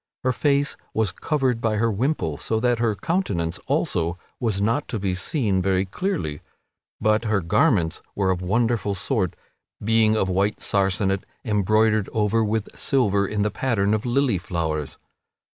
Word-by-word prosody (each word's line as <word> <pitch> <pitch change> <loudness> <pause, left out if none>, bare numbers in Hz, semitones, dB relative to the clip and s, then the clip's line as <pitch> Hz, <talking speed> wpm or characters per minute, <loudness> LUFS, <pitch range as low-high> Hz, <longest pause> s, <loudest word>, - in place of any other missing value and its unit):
Her 130 - +2
face 140 +2 +1 0.2
was 110 -4 +1
covered 130 - -1
by 115 -2 +1
her 115 +2 +1
wimple 100 - -1
so 110 - -1
that 120 0 +1
her 115 -3 +1
countenance 100 - -1
also 85 +1 0 0.2
was 110 -5 0
not 115 +8 0
to 115 - -3
be 95 -1 -1
seen 100 - 0
very 95 0 +1
clearly, 95 - -3 0.6
but 110 +1 +2
her 110 -2 +2
garments 95 - +2
were 95 -2 +1
of 90 -1 -2
wonderful 105 +1 +1
sort, 95 - -1 0.4
being 110 0 +3
of 95 - +1
white 100 +3 0
sarcenet 95 0 +1 0.2
embroidered 110 0 +2
over 110 +1 +2
with 110 0 -2
silver 100 -8 +2
in 105 0 -1
the 105 - 0
pattern 105 -2 0
of 110 - 0
lily 125 -5 +1
flowers. 80 -5 -3
105 Hz, 155 wpm, -23 LUFS, 95-115 Hz, 0.6 s, being